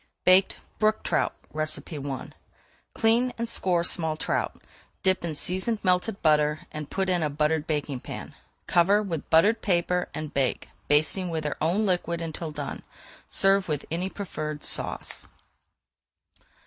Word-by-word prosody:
BAKED 185 +1 +5 0.2
BROOK 215 0 +2
TROUT - - +1 0.2
I 155 0 0 1.3
Clean 235 +3 +3
and 235 0 -2
score 180 -6 +2
small 160 -3 +1
trout, - - -2 0.4
dip 190 -1 +3
in 165 -3 -2
seasoned 185 +9 +1
melted 185 +3 +1
butter, 150 -1 +3
and 155 -1 -6
put 190 -1 -1
in 180 -2 +2
a 155 - +1
buttered 150 +1 0
baking 145 -4 -2
pan. - - -8 0.3
Cover 195 +5 +4
with 165 -7 -4
buttered 210 +8 +4
paper 180 -1 +1
and 155 -1 -5
bake, 135 -2 0 0.2
[Page 150 +1 +5
417] 190 +4 -1
basting - - -4
with 160 -2 -2
their 150 - -2
own 180 +8 +2
liquid 175 -3 0
until 165 0 -5
done. 150 - -5 0.5
Serve 195 0 +3
with 150 -3 -2
any 180 +3 -1
preferred 155 -7 -5
sauce. - - -2
170 Hz, 150 wpm, -26 LUFS, 155-195 Hz, 1.3 s, BAKED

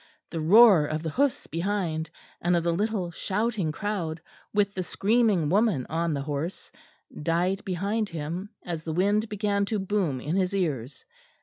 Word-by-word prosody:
The 165 - -3
roar 190 -2 +7
of 155 +1 -3
the 160 - -2
hoofs 275 - +1
behind, 165 -2 -2 0.3
and 175 +1 +2
of 170 - +1
the 170 - +1
little 200 -1 -1
shouting 200 -1 -1
crowd, 170 -3 -3 0.3
with 205 -1 +1
the 185 - -2
screaming 205 -3 +2
woman 195 - +2
on 165 0 0
the 140 - -3
horse, 150 +5 -4 0.5
died 175 +5 0
behind 200 +3 -1
him 170 +5 -5 0.2
as 170 -3 -3
the 160 - -3
wind 205 +5 +2
began 205 -1 0
to 215 +1 -1
boom 190 -8 -1
in 150 +7 -2
his 190 0 +1
ears. 140 -8 -2
180 Hz, 165 wpm, -27 LUFS, 160-205 Hz, 0.5 s, roar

